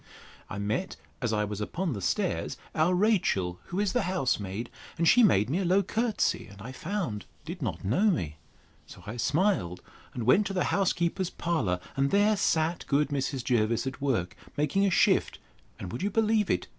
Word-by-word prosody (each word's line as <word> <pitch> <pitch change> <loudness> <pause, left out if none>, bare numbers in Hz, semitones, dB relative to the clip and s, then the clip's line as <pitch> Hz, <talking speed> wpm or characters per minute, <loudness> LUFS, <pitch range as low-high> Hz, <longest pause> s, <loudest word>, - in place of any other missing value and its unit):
I 100 - -5
met, 105 - -2 0.3
as 120 -3 0
I 105 -1 +1
was 105 0 -4
upon 165 - -2
the 100 - -5
stairs, - - -1 0.2
our 165 +4 +2
Rachel, 175 - +1
who 180 - -4
is 205 -2 +1
the 245 - +2
house 160 -13 +1
maid; 100 +4 -5 0.3
and 170 0 +2
she 245 - +7
made 110 - +4
me 155 +9 0
a - - 0
low 185 +3 +3
courtesy, 225 +3 0
and 100 0 -14
I 115 +6 -7
found 130 - -4 0.2
did 170 +2 -7
not 95 - -3
know 160 - +3
me. 80 - -1 0.5
So - - -13
I 110 +3 -6
smiled, 145 - 0 0.3
and 120 - -3
went 190 - +4
to 195 - -4
the 180 - +1
housekeeper's 180 -1 +1
parlour; 140 - -1 0.2
and 135 0 +2
there 205 +4 +4
sat 165 -3 +1
good 145 +1 +2
Mrs. 135 -2 -2
Jervis 115 -1 +1
at 130 +1 -5
work, 110 -11 0 0.2
making 150 +7 +2
a - - +3
shift: 185 - +3 0.4
and, 90 - -6
would 120 - -5
you 200 - +1
believe 215 -1 +2
it? 90 - +1
150 Hz, 195 wpm, -28 LUFS, -, 0.5 s, she